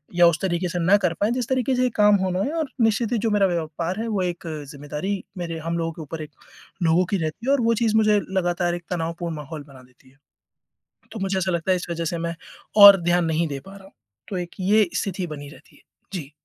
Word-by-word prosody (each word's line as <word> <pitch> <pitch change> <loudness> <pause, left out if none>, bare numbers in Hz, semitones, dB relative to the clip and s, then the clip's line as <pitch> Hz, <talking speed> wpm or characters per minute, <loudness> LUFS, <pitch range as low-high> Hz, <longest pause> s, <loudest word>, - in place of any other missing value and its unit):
या 175 -1 +7
उस 170 -1 +2
तरीक़े 180 -1 0
से 175 - -3
ना 180 +4 +4
कर 170 -2 +2
पाएँ 210 +3 +2
जिस 245 -2 -2
तरीक़े 260 0 +1
से 250 - +1
ये 250 - +2
काम 210 0 +6
होना 185 0 -1
है 290 - -2
और 310 -4 -1
निश्चित 225 +1 +2
ही - - +2
जो 225 - 0
मेरा 200 -2 +3
व्यापार 170 +2 -3
है 230 - -3
वो 200 -3 0
एक 175 -1 -4 0.2
ज़िम्मेदारी 150 +7 -4 0.3
मेरे 165 -1 -4
हम 165 +1 -3
लोगों 165 0 -1
के 160 - -9
ऊपर 160 +2 -7
एक 150 - -11 0.5
लोगों 170 +3 +3
की 200 - +2
रहती 160 +9 -4
है - - +3
और 275 - +2
वो 230 - +4
चीज़ 220 -1 +2
मुझे 215 -1 +4 0.2
लगातार 175 0 0
एक 175 - -8
तनावपूर्ण 170 -1 -3
माहौल 150 0 -7
बना 130 -2 -15
देती 130 +1 -24
है। 135 - -28 1.0
तो 220 - -6
मुझे 190 0 0
ऐसा 185 0 0
लगता 170 +2 0
है - - +3
इस 180 - -5
वजह 170 0 -2
से 170 +1 -2
मैं 170 0 -3 0.5
और 200 -2 +10
ध्यान 175 0 +2
नहीं 160 0 0
दे 140 -1 -5
पा 195 - -11
रहा 195 - -14
हूँ 195 - -16 0.4
तो 190 -4 -3
एक 175 -1 -5
ये 205 +1 +3
स्थिति 190 -3 -2
बनी 145 -2 -7
रहती - - -17
है, - - -23 0.3
जी। 155 -5 -5
175 Hz, 250 wpm, -23 LUFS, 165-205 Hz, 1.0 s, और